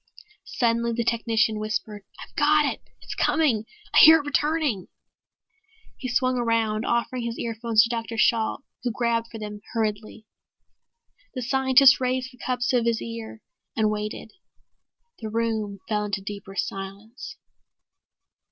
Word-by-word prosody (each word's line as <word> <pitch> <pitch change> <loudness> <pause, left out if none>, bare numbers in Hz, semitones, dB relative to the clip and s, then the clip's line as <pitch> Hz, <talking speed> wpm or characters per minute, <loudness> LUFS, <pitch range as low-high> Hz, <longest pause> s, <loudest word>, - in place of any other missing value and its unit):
Suddenly 235 -1 +1
the 235 +1 -1
technician 225 -2 +1
whispered, 215 -1 -3 0.2
"I've - - -12
got 300 +1 +4
it! - - -2 0.2
It's - - -7
coming! 250 -10 +1 0.3
I - - +6
hear 320 +1 +10
it 295 - -5
returning!" 290 - 0 1.1
He 260 - -6
swung 255 0 +1
around, 225 -2 0
offering 235 +1 -1
his 235 0 -4
earphones 230 -1 +2
to 230 - -2
Dr. 230 -1 -4
Shalt, 225 +4 +1 0.2
who 250 - -1
grabbed 230 0 -1
for 230 - -9
them 210 -1 -7
hurriedly. 215 -1 -3 1.1
The 255 - -3
scientist 265 +1 +5
raised 255 0 -1
the 250 - -20
cups 250 -1 -1
to 250 -2 +3
his 230 -1 0
ear 230 -1 -8 0.3
and 215 -1 +2
waited. 210 +1 -5 0.9
The 220 - -5
room 220 -2 -2
fell 210 -1 -1
into 200 -1 -3
deeper 200 -1 -8
silence. 200 - -6
230 Hz, 140 wpm, -25 LUFS, 215-250 Hz, 1.1 s, hear